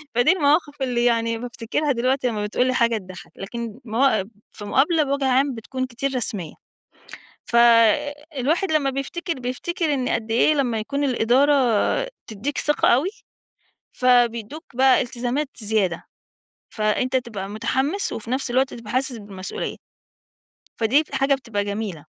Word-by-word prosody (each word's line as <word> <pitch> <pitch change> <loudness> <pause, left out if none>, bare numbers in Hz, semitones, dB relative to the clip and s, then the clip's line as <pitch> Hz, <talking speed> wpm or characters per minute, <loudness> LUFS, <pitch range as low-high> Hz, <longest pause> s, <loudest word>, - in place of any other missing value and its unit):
فدي 245 +8 +5
المواقف 295 -3 +1
اللي 245 -2 0
يعني 230 -1 +1
بافتكرها 245 +4 -2
دلوقتي 255 +2 +1
لمّا 215 -3 -2
بتقول 230 +4 0
لي 255 - +1
حاجة 235 -2 +2
تضحّك، 185 -2 -11
لكن 230 +3 -6
موا 225 -2 +2 0.3
في 205 - -10
مقابلة 300 - +3
بوَجه 280 -1 -1
عام 265 +1 +2
بتكون 260 +3 -4
كتير 265 +2 -3
رسميّة. 205 -9 -1 0.9
فالواحد 280 - +3
لمّا 285 -3 +2
بيفتكر، 325 +6 -4
بيفتكر 295 +5 -2
إن 255 -2 -1
قدّ 225 -1 -2
إيه 240 +7 +4
لمّا 245 -6 0
يكون 280 +7 -2
الإدارة 260 +3 +3 0.7
تدّيك 220 +7 -4
ثقة 295 - +2
أوي، 280 +11 +3 0.8
فبيدّوك 245 +3 +1
بقى 260 +1 +5
التزامات 250 +4 -2
زيادة، 205 -5 -1 0.6
فأنت 220 +4 0
تبقى 215 -6 -4
متحمّس 265 - -1
وفي 225 +1 -6
نَفْس 260 -1 -1
الوقت 260 +2 +1
تبقى 230 -3 -9
حاسس 255 -1 0
بالمسؤوليّة. 195 -2 -6 1.0
فديَّة 230 +6 +4
ال - - -1
حاجة 270 +1 +3
بتبقى 230 -6 -3
جميلة. 200 -7 -4
250 Hz, 140 wpm, -23 LUFS, 225-275 Hz, 1.0 s, فدي